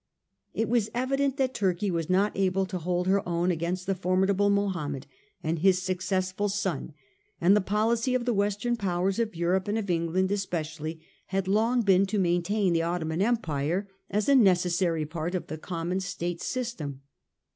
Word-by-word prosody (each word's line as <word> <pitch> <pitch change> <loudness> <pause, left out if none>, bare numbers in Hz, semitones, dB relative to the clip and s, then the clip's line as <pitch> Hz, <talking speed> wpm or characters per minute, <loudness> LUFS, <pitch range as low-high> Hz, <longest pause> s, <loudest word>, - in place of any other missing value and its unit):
It 225 +1 0
was 225 -1 +1
evident 270 +2 0
that 260 -2 +1
Turkey 190 0 0
was 165 -1 -2
not 195 +3 +2
able 190 0 +1
to 185 -1 -4
hold 180 +1 -1
her 195 +1 +3
own 175 +1 +1
against 175 +2 -2
the 195 - +1
formidable 190 +2 +2
Mohammed 175 -9 -1 0.4
and 160 +1 -1
his 185 +1 +4
successful 185 +2 -1
son; 190 -7 -2 0.4
and 185 +4 +5
the 210 - +3
policy 225 +5 +1
of 245 -2 0
the 245 - +1
"Western 205 +3 0
powers 190 0 0
of 225 -5 -1
Europe, 180 +3 0
and 210 +2 0
of 200 -4 -2
England 175 +3 0
especially, 160 -5 -3 0.3
had 190 0 -1
long 225 +5 +2
been 195 -1 +4
to 210 - -1
maintain 180 +1 +1
the 165 - +2
Ottoman 165 0 -1
Empire 185 -5 0 0.2
as 210 +2 0
a 280 - +5
necessary 180 - +3
part 165 +3 -4
of 180 - -2
the 155 - -6
common 175 +2 -3
State 175 -2 -4
system. 170 - -4
185 Hz, 170 wpm, -27 LUFS, 170-205 Hz, 0.4 s, and